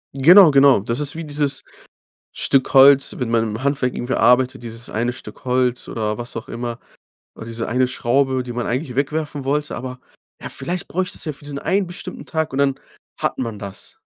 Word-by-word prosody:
Genau, 170 Hz, +5 st, +8 dB
genau. 140 Hz, -4 st, +6 dB
Das 115 Hz, +7 st, -3 dB
ist 145 Hz, +1 st, -2 dB
wie 165 Hz, -, -5 dB
dieses 145 Hz, -2 st, -1 dB, 0.7 s
Stück 135 Hz, 0 st, +1 dB
Holz, 135 Hz, +1 st, +6 dB
wenn 125 Hz, -3 st, -2 dB
man 115 Hz, -1 st, +2 dB
im 110 Hz, +3 st, -4 dB
Handwerk 135 Hz, -3 st, 0 dB
irgendwie 125 Hz, +2 st, -3 dB
arbeitet, 125 Hz, 0 st, +3 dB
dieses 115 Hz, +1 st, -8 dB
eine 120 Hz, +3 st, -1 dB
Stück 130 Hz, -, -12 dB
Holz 125 Hz, -1 st, 0 dB
oder 105 Hz, -2 st, -2 dB
was 120 Hz, 0 st, -7 dB
auch 115 Hz, -, -6 dB
immer. 120 Hz, 0 st, -5 dB, 0.6 s
Oder 115 Hz, -, -9 dB
diese 115 Hz, 0 st, -4 dB
eine 125 Hz, +2 st, +2 dB
Schraube, 130 Hz, +1 st, 0 dB
die 125 Hz, -, -7 dB
man 120 Hz, 0 st, -3 dB
eigentlich 125 Hz, +1 st, -3 dB
wegwerfen 145 Hz, 0 st, -2 dB
wollte. 145 Hz, +2 st, -1 dB
Aber 130 Hz, 0 st, -7 dB, 0.4 s
ja, -, -, -5 dB
vielleicht 175 Hz, +1 st, -4 dB
brauche 185 Hz, +1 st, -1 dB
ich 190 Hz, -, -8 dB
das -, -, -7 dB
ja 155 Hz, -, -3 dB
für 145 Hz, -, -12 dB
diesen 145 Hz, -1 st, -6 dB
einen 195 Hz, 0 st, +1 dB
bestimmten 180 Hz, +1 st, -8 dB
Tag 160 Hz, -2 st, -2 dB
und 135 Hz, -, -3 dB
dann 140 Hz, -1 st, +2 dB, 0.5 s
hat -, -, -1 dB
man 115 Hz, -5 st, -4 dB
das. 100 Hz, -1 st, -10 dB
130 Hz, 205 wpm, -20 LUFS, 120-145 Hz, 0.7 s, Genau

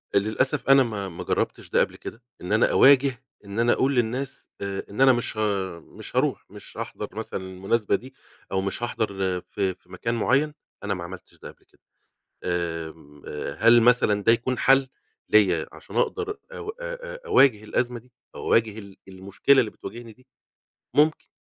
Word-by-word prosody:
للأسَف 125 Hz, +7 st, 0 dB
أنا 135 Hz, 0 st, +7 dB
ما 105 Hz, -5 st, -4 dB
ما 85 Hz, -, -7 dB
جرّبتش -, -, -2 dB
ده -, -, +2 dB
قبل -, -, +1 dB
كده، 115 Hz, -, -9 dB, 0.2 s
إن 90 Hz, -, -6 dB
أنا 110 Hz, -, +3 dB
أواجِه 135 Hz, -2 st, +5 dB, 0.2 s
إن 100 Hz, +2 st, -5 dB
أنا 120 Hz, +1 st, +4 dB
أقول 135 Hz, +1 st, +1 dB
للناس 125 Hz, +3 st, -2 dB
آآ، 100 Hz, -1 st, -3 dB
إن 105 Hz, +6 st, -4 dB
أنا 135 Hz, -1 st, +7 dB
مش 120 Hz, -2 st, -3 dB
ه -, -, -2 dB, 0.4 s
مش -, -, -12 dB
هاروح، -, -, +1 dB
مش -, -, -13 dB
هاحضَر -, -, -5 dB
مثلًا 95 Hz, -, -5 dB
المناسبة 95 Hz, +4 st, 0 dB
دي 130 Hz, +2 st, -8 dB, 0.4 s
أو 95 Hz, -, +1 dB
مش 100 Hz, +4 st, -3 dB
هاحضر 95 Hz, -6 st, -2 dB
ف -, -, -40 dB
في 95 Hz, -2 st, -2 dB
مكان 115 Hz, 0 st, -3 dB
معيَّن 140 Hz, +6 st, +2 dB, 0.3 s
أنا 100 Hz, -, -1 dB
ما 90 Hz, -3 st, -5 dB
عملتش 90 Hz, +1 st, -11 dB
ده -, -, -9 dB
قَبل -, -, -28 dB
كده. -, -, -32 dB, 0.6 s
آمم، 80 Hz, -4 st, -4 dB
آآ، 75 Hz, -, -5 dB
هل 115 Hz, +2 st, +7 dB
مثلًا 115 Hz, -4 st, +3 dB
ده 115 Hz, -, +5 dB
يكون 120 Hz, +2 st, 0 dB
حَل 135 Hz, 0 st, +4 dB, 0.4 s
ليّا 95 Hz, -7 st, +4 dB
عشان -, -, -11 dB
أقدر 435 Hz, -3 st, 0 dB, 0.2 s
أو 485 Hz, -, -8 dB
أ -, -, -11 dB, 0.4 s
أ -, -, -12 dB
أواجه 130 Hz, -, +4 dB
الأزمة 120 Hz, +2 st, -1 dB
دي، 125 Hz, +2 st, -21 dB, 0.2 s
أواجه 110 Hz, -2 st, +1 dB
ال 100 Hz, -2 st, -11 dB
المشكلة 100 Hz, +8 st, +2 dB
اللي 110 Hz, -, -1 dB
بتواجهني 115 Hz, +2 st, -9 dB
دي؟ 130 Hz, +4 st, -24 dB, 0.7 s
ممكن. 150 Hz, +1 st, +3 dB
115 Hz, 175 wpm, -25 LUFS, 95-130 Hz, 0.7 s, أنا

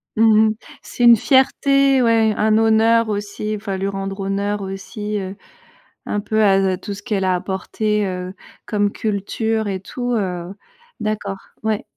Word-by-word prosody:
Mmh 220 Hz, 0 st, +5 dB
mh. -, -, -1 dB, 0.3 s
C'est 245 Hz, -, -4 dB
une 235 Hz, -1 st, +9 dB
fierté, 275 Hz, +2 st, +3 dB
ouais, 225 Hz, -2 st, +3 dB
un 215 Hz, +1 st, +2 dB
honneur 225 Hz, +1 st, +3 dB
aussi, 205 Hz, +1 st, -3 dB
enfin, 200 Hz, -2 st, -4 dB
lui 195 Hz, +1 st, -2 dB
rendre 195 Hz, 0 st, -4 dB
honneur 200 Hz, +1 st, -2 dB
aussi, 205 Hz, +2 st, -5 dB
heu, 190 Hz, 0 st, -6 dB, 0.7 s
un 205 Hz, -, -2 dB
peu 215 Hz, +1 st, 0 dB
à 200 Hz, -2 st, +5 dB, 0.2 s
à 185 Hz, -, -2 dB
tout 200 Hz, +2 st, -6 dB
ce 200 Hz, 0 st, -10 dB
qu'elle 205 Hz, -5 st, -1 dB
a 185 Hz, -1 st, +2 dB
apporté, 205 Hz, +3 st, -2 dB
heu, 185 Hz, -1 st, -4 dB, 0.3 s
comme 205 Hz, -1 st, 0 dB
culture 220 Hz, +2 st, -2 dB
et 190 Hz, -2 st, -3 dB
tout, 245 Hz, +5 st, -4 dB
heu. 180 Hz, -3 st, -3 dB, 0.5 s
D'accord, 205 Hz, -2 st, -3 dB, 0.3 s
ouais. 220 Hz, -1 st, -1 dB
210 Hz, 160 wpm, -20 LUFS, 195-220 Hz, 0.7 s, une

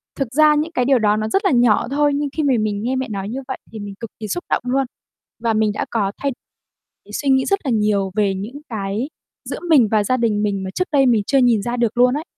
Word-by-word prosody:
thực 265 Hz, -4 st, -3 dB
ra 305 Hz, +1 st, +5 dB
những 310 Hz, +3 st, -1 dB
cái 250 Hz, -6 st, 0 dB
điều 265 Hz, -1 st, +4 dB
đó 210 Hz, -1 st, +2 dB
nó 215 Hz, 0 st, -2 dB
rất 390 Hz, -, 0 dB
là -, -, +4 dB
nhỏ 240 Hz, -4 st, +3 dB
thôi, 290 Hz, +1 st, +2 dB
nhưng 290 Hz, 0 st, -1 dB
khi 310 Hz, -, +1 dB
mà 275 Hz, -3 st, +3 dB
mình 210 Hz, -1 st, -2 dB
nghe 255 Hz, +3 st, -1 dB
mẹ 260 Hz, 0 st, -2 dB
nói 200 Hz, -1 st, -4 dB
như 255 Hz, +4 st, -4 dB
vậy 260 Hz, -, -3 dB
thì 220 Hz, -, -8 dB
mình 205 Hz, -1 st, -7 dB
cực 230 Hz, -, -6 dB
kỳ 215 Hz, -, -5 dB
xúc 350 Hz, -, -3 dB
động -, -, 0 dB
luôn. 265 Hz, +2 st, +1 dB, 0.5 s
Và 230 Hz, -1 st, 0 dB
mình 215 Hz, -1 st, +2 dB
đã -, -, -2 dB
có 205 Hz, -4 st, 0 dB
thay 280 Hz, -, -1 dB, 0.8 s
suy 285 Hz, -, -1 dB
nghĩ 265 Hz, -1 st, +3 dB
rất 395 Hz, 0 st, +1 dB
là 260 Hz, -, 0 dB
nhiều 210 Hz, -3 st, +1 dB
về 205 Hz, -2 st, +1 dB
những 225 Hz, +10 st, -7 dB
cái 215 Hz, +3 st, -3 dB, 0.4 s
giữa -, -, -5 dB
mình 275 Hz, -9 st, +6 dB
và 215 Hz, -2 st, +3 dB
gia 255 Hz, +5 st, +1 dB
đình 220 Hz, -3 st, +1 dB
mình 200 Hz, -2 st, -1 dB
mà 190 Hz, -, -4 dB
trước 365 Hz, -, 0 dB
đây 280 Hz, -3 st, +4 dB
mình 230 Hz, -5 st, +3 dB
chưa 275 Hz, -, +3 dB
nhìn 240 Hz, -4 st, +3 dB
ra 240 Hz, +2 st, -2 dB
được 235 Hz, -1 st, 0 dB
luôn 250 Hz, +1 st, +5 dB
ấy. 305 Hz, -, -4 dB
240 Hz, 270 wpm, -20 LUFS, 210-275 Hz, 0.8 s, mình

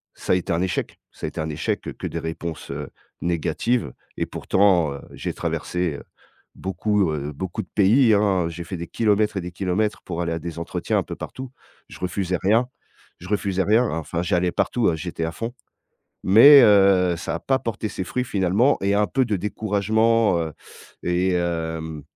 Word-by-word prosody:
ça -, -, -2 dB
a 90 Hz, -, +5 dB
été 90 Hz, -, -2 dB
un 85 Hz, -, 0 dB
échec, 90 Hz, -3 st, -2 dB
ça -, -, -6 dB
a -, -, -3 dB
été -, -, -6 dB
un 80 Hz, -, -2 dB
échec. 75 Hz, 0 st, -2 dB, 0.2 s
Que -, -, -5 dB
des -, -, -4 dB
réponses, 80 Hz, 0 st, -6 dB
heu, 70 Hz, 0 st, -5 dB, 0.3 s
négatives 85 Hz, -, -1 dB, 0.2 s
et -, -, -1 dB
pourtant, 90 Hz, -7 st, +2 dB
heu, 70 Hz, -, -8 dB
j'ai -, -, -4 dB
traversé, 90 Hz, -5 st, -2 dB, 0.6 s
beaucoup, 95 Hz, 0 st, 0 dB
heu, 75 Hz, 0 st, -4 dB
beaucoup 95 Hz, +8 st, -4 dB
de -, -, -15 dB
pays, 110 Hz, +3 st, +5 dB
hein. 95 Hz, -4 st, +2 dB
J'ai 85 Hz, +1 st, -7 dB
fait 90 Hz, -, -5 dB
des 85 Hz, 0 st, -6 dB
kilomètres 105 Hz, -2 st, +1 dB
et -, -, -1 dB
des 90 Hz, 0 st, -7 dB
kilomètres 100 Hz, +3 st, -1 dB
pour 85 Hz, -2 st, -5 dB
aller 85 Hz, -1 st, -2 dB
à 80 Hz, -, -2 dB
des 85 Hz, 0 st, -6 dB
entretiens 85 Hz, -, -1 dB
un -, -, +1 dB
peu -, -, -6 dB
partout. 130 Hz, -1 st, -8 dB, 0.4 s
Je -, -, -12 dB
refusais 90 Hz, -1 st, -1 dB
rien, 115 Hz, +6 st, +3 dB, 0.5 s
je 90 Hz, -, -11 dB
refusais 100 Hz, -2 st, 0 dB
rien 115 Hz, +4 st, +3 dB
enfin, 80 Hz, +1 st, -3 dB
j'allais 90 Hz, 0 st, +1 dB
partout 115 Hz, -9 st, +1 dB
j'étais 85 Hz, 0 st, -4 dB
à 80 Hz, -, -3 dB
fond. 115 Hz, +6 st, -5 dB, 0.7 s
Mais 130 Hz, +8 st, +9 dB
heu, 95 Hz, -4 st, +5 dB
ça 85 Hz, -, -4 dB
a -, -, -7 dB
pas 135 Hz, -1 st, +1 dB
porté 110 Hz, -1 st, -3 dB
ses 95 Hz, -, -5 dB
fruits 125 Hz, +7 st, -2 dB
finalement 105 Hz, +6 st, +2 dB
et 100 Hz, +1 st, +2 dB
un 105 Hz, 0 st, +3 dB
peu 130 Hz, -1 st, +1 dB
de 105 Hz, -3 st, 0 dB
découragement, 110 Hz, +1 st, +1 dB
heu 80 Hz, -1 st, -3 dB, 0.5 s
et 90 Hz, +1 st, +1 dB
hem 80 Hz, -3 st, -3 dB
95 Hz, 190 wpm, -23 LUFS, 85-105 Hz, 0.7 s, Mais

